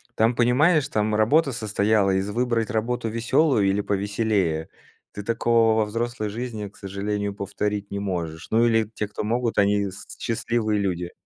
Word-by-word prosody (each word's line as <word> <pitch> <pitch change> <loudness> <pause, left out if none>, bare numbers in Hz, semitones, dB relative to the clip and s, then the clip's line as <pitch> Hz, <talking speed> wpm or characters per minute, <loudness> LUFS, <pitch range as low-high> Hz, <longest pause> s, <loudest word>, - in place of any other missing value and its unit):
Там 115 +2 +2
понимаешь, 145 +6 +3
там 105 0 0
работа 135 +6 +3
состояла 105 -2 +1
из: 95 +1 0
выбрать 120 +1 0
работу 115 +1 -1
веселую 115 0 +2
или 100 +1 +1
повеселее. 100 -5 -1 0.4
Ты 105 - -6
такого 115 0 +2
во 110 - +3
взрослой 115 +1 -3
жизни, 110 -2 -5
к 100 - -17
сожалению, 100 +1 -3
повторить 100 +1 -3
не 100 - -4
можешь. 85 -5 -4
Ну 115 +2 +4
или 115 -1 +3
те, 105 - -2
кто 105 - -5
могут, 115 +2 -1
они 100 0 +2
с 95 - -10
счастливые 110 -2 -1
люди. 90 -2 -2
110 Hz, 160 wpm, -24 LUFS, 100-115 Hz, 0.4 s, Ну